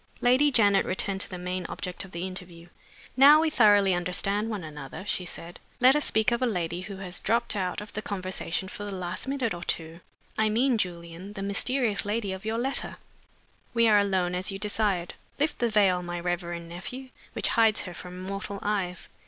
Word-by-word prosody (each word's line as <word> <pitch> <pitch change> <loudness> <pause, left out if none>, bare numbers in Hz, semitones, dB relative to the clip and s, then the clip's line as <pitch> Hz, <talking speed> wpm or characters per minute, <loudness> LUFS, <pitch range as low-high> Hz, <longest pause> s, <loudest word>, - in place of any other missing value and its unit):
Lady 255 +4 +4
Janet 205 -7 +4
returned 190 +1 -2
to - - -3
the 185 - -6
main 180 +1 -3
object 180 +1 -5
of 190 - -12
the 170 +1 -4
interview. 180 -2 -8 0.5
"Now 285 +4 +8
we 320 0 +2
thoroughly 205 -6 +5
understand 195 +4 0
one 210 -5 -4
another," 150 +2 -8
she 185 -3 -1
said, 170 0 -8 0.2
"let 255 +3 +7
us 295 - +1
speak 220 +1 +2
of 235 +1 0
a 255 - +3
lady 175 -4 -2
who 195 +1 -7
has 185 -1 -5
dropped 230 +1 +1
out 185 -1 -2
of 210 - -10
the 215 - -3
conversation 190 -2 -3
for 205 - -7
the 205 -1 -5
last 185 +4 -3
minute 265 -6 0
or 175 0 -6
two. 165 -1 -3 0.4
I 215 0 +3
mean, 240 +2 +2
Julian, 175 +1 -4
the 195 -2 -5
mysterious 215 +1 +1
lady 205 -1 -1
of 190 +2 -8
your 220 +1 -1
letter. 265 +3 -1 0.8
We 230 0 +5
are 210 -2 +6
alone, 190 -3 +1
as 185 +2 -2
you 195 - -4
desired. 205 -4 0 0.3
Lift 295 +2 0
the 240 - +2
veil, 195 -4 +3
my 175 0 -4
reverend 175 -1 -3
nephew, 250 +10 -7 0.2
which - - 0
hides 225 -2 +3
her 180 - -7
from 180 +1 -9
mortal 195 +1 -4
eyes! 190 -4 -2
195 Hz, 200 wpm, -27 LUFS, 180-220 Hz, 0.8 s, Now